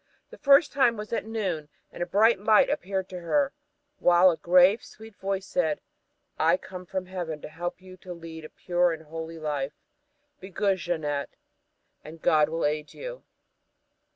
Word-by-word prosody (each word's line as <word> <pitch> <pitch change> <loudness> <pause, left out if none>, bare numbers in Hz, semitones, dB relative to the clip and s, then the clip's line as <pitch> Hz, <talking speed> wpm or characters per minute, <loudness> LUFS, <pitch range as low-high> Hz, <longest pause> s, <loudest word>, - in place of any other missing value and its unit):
The - - -12
first 280 +2 +5
time 250 -4 +3
was 215 +2 -6
at 225 - -2
noon 185 -9 -3 0.2
and - - -9
a 175 - -1
bright 210 +3 +4
light 210 +1 +4
appeared 190 0 -2
to 180 - -6
her, 275 - +1 0.5
while 175 +1 +6
a 165 - -4
grave, 180 +6 +5
sweet 220 -1 -13
voice 195 0 -2
said, 160 -5 0 0.6
"I 165 +3 +4
come 185 -1 -10
from 190 0 -3
Heaven 175 -4 -5
to - - -5
help 175 +3 -5
you 185 0 -13
to 180 0 -11
lead 165 -2 -9
a 155 - -9
pure 175 -1 +1
and 160 0 -8
holy 160 +1 -7
life. 150 -3 -3 0.7
Be 190 - -10
good, 195 0 0
Jeannette, 150 -5 -2 0.7
and 160 +2 -11
God 155 -1 +3
will 165 0 -1
aid 150 +1 -2
you." - - -8
180 Hz, 175 wpm, -27 LUFS, 160-195 Hz, 0.7 s, while